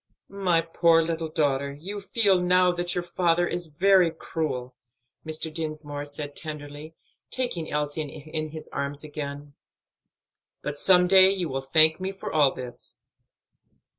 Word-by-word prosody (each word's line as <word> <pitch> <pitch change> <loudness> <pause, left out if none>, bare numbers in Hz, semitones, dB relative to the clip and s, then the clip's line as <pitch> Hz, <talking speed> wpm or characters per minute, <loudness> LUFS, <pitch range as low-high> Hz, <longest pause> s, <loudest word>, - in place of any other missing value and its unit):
"My 185 -4 +1
poor 165 0 +3
little 165 0 -3
daughter, 140 -3 0
you 185 +9 -7
feel 195 -3 +2
now 180 0 +4
that 175 0 -3
your 175 - -1
father 175 0 +1
is 175 -1 -2
very 180 +3 +4
cruel," 135 -6 -4 0.5
Mr. 155 0 -1
Dinsmore 155 -2 -4
said 145 0 -5
tenderly, 150 0 -8 0.3
taking 240 -11 -3
Elsie 150 +1 -1
in 155 +1 -6
his 155 0 -6
arms 140 +1 -4
again, 145 -1 -7 1.1
"but 150 - -3
some 180 +4 +5
day 190 0 +7
you 190 -3 -1
will 135 0 -3
thank 155 +5 +4
me 190 +1 -3
for 195 - -7
all 145 -3 +4
this." 125 -2 -9
160 Hz, 140 wpm, -26 LUFS, 145-175 Hz, 1.1 s, day